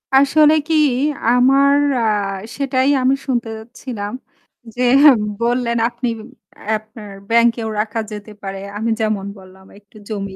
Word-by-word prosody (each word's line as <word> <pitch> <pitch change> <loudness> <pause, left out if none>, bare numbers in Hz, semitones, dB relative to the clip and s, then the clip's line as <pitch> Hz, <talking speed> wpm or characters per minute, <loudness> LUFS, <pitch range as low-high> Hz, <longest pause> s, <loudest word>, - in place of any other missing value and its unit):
আসলে 295 +3 +5
কি 325 - +1 0.5
আমার 270 +3 +4 0.2
অ্যা 235 - 0 0.5
সেটাই 270 -1 +1
আমি 260 +1 +3
শুনতে 240 -3 -1
যাচ্ছিলাম 220 -1 -7 0.6
যে 250 - -4 0.6
বললেন 235 0 0
আপনি 245 +1 -5 0.6
অ্যা 220 - -1
আপনার 215 -1 -13 0.2
ব্যাংকেও 230 -1 +2
রাখা 220 +1 -2
যেতে 210 0 -8
পারে। 195 0 -5 0.2
আমি 225 +2 -2
যেমন 215 -3 -1
বললাম 190 0 -16
একটু 205 +1 -20
জমি 200 -2 -5
230 Hz, 130 wpm, -18 LUFS, 210-255 Hz, 0.6 s, আসলে